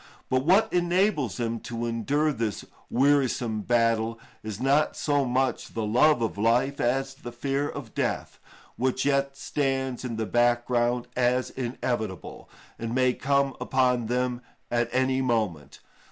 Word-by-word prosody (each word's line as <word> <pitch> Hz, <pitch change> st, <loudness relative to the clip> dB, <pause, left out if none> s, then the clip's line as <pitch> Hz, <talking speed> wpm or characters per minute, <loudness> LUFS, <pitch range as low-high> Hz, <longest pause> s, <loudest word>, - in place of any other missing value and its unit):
But 130 Hz, 0 st, +2 dB
what 205 Hz, +6 st, +4 dB
enables 175 Hz, -, +1 dB
them 115 Hz, -1 st, -2 dB
to 120 Hz, 0 st, -5 dB
endure 140 Hz, +7 st, 0 dB
this 115 Hz, -4 st, -3 dB, 0.2 s
wearisome 130 Hz, -5 st, +2 dB
battle 115 Hz, 0 st, +1 dB, 0.2 s
is 110 Hz, -2 st, -6 dB
not 140 Hz, +3 st, +2 dB
so 145 Hz, -2 st, +1 dB
much 130 Hz, +1 st, -1 dB
the 115 Hz, -1 st, -1 dB
love 125 Hz, +4 st, +4 dB
of 110 Hz, -2 st, -3 dB
life 120 Hz, +6 st, +2 dB
as 135 Hz, +2 st, 0 dB
the 135 Hz, -3 st, -9 dB
fear 135 Hz, +4 st, -1 dB
of 135 Hz, -6 st, -8 dB
death, -, -, -2 dB, 0.4 s
which 130 Hz, +1 st, 0 dB
yet 140 Hz, -1 st, +1 dB
stands 135 Hz, -3 st, -2 dB
in 120 Hz, -3 st, -4 dB
the 110 Hz, 0 st, -2 dB
background 120 Hz, +1 st, +1 dB
as 125 Hz, 0 st, +1 dB
inevitable, 120 Hz, -6 st, -4 dB, 0.3 s
and 115 Hz, +1 st, -3 dB
may 130 Hz, -1 st, +3 dB
come 140 Hz, 0 st, +1 dB
upon 125 Hz, -3 st, +1 dB
them 125 Hz, +1 st, -1 dB, 0.3 s
at 120 Hz, -1 st, +1 dB
any 130 Hz, +1 st, +1 dB
moment. 105 Hz, -, -2 dB
125 Hz, 140 wpm, -26 LUFS, 115-135 Hz, 0.4 s, what